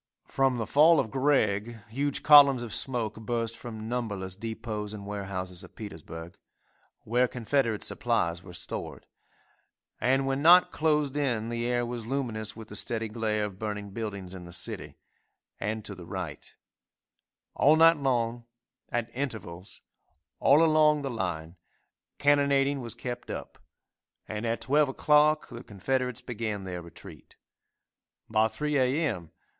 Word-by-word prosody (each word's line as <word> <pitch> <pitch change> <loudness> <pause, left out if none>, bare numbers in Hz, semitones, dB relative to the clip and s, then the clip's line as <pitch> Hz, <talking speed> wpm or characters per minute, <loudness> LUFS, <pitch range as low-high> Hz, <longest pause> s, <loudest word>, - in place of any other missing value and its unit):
From 135 -2 +1
the 115 - -2
fall 155 +5 +6
of 110 - -1
Gregg, 120 -5 +1
huge 140 +5 -1
columns 140 -4 +8
of 115 - -6
smoke 115 -5 0
burst 115 0 -2
from 110 -3 -8
numberless 105 -6 -3
depots 110 -1 -5
and 100 -2 -8
warehouses 95 -2 -5
of 95 - -14
Petersburg, 80 -4 -9 0.6
where 125 +3 +2
Confederate 120 -2 0
supplies 85 -8 -1
were 90 - -12
stored, 85 - -6 0.9
and 135 +2 +2
when 135 +1 -1
night 175 +3 +7
closed 150 -3 +1
in 120 -6 0
the 120 0 -2
air 120 0 +1
was 120 -2 -5
luminous 115 -5 -3
with 110 -1 -10
the 105 - -8
steady 110 +1 -2
glare 110 -1 -1
of 100 -2 -8
burning 105 -2 -4
buildings 100 -4 -5
in 90 -2 -9
the 85 - -11
city, - - -1 0.6
and 110 0 -3
to 100 - -6
the 90 -3 -11
right; 90 -6 -6 1.0
all 150 +3 +5
night 165 0 +6
long, 120 -4 -1 0.4
at 120 0 -3
intervals, 110 -9 -5 0.6
all 145 +4 +5
along 155 -2 +4
the 135 - -2
line, 90 -6 -4 0.6
cannonading 140 -1 +3
was 115 -2 -7
kept 125 -1 -6
up, - - -7 0.7
and 110 +2 -3
at 115 +1 -1
12 145 +1 +3
o'clock 150 +2 +3
the 120 0 -9
Confederates 125 +4 -2
began 110 -5 -4
their 90 -2 -5
retreat. 85 -1 -13 0.9
By 110 0 +3
3 150 +5 -2
a. 130 +5 +2
m. 90 - -4
115 Hz, 145 wpm, -28 LUFS, 105-135 Hz, 1.0 s, columns